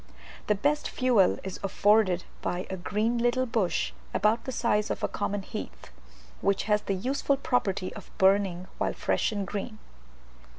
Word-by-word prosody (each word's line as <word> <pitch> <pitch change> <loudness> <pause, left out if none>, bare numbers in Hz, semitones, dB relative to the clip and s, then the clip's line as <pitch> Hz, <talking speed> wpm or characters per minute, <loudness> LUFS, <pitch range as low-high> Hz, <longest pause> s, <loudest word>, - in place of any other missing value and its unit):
The 210 - +3
best 290 +9 0
fuel 245 -7 +3
is 190 -1 -6
afforded 195 -2 +3 0.2
by 180 +1 -2
a - - -2
green 215 +6 0
little 240 +2 +2
bush 225 -7 0 0.2
about 220 +2 +2
the 260 - -3
size 220 -4 +1
of - - -1
common 205 -1 -2
heath, 60 - -8 0.5
which 200 0 +1
has 210 0 +2
the 195 - -2
useful 275 +7 0
property 200 -8 0
of - - -11
burning 190 -2 +3
while - - 0
fresh - - 0
and 205 -2 -2
green. 210 +3 -5
205 Hz, 155 wpm, -28 LUFS, 190-235 Hz, 0.5 s, The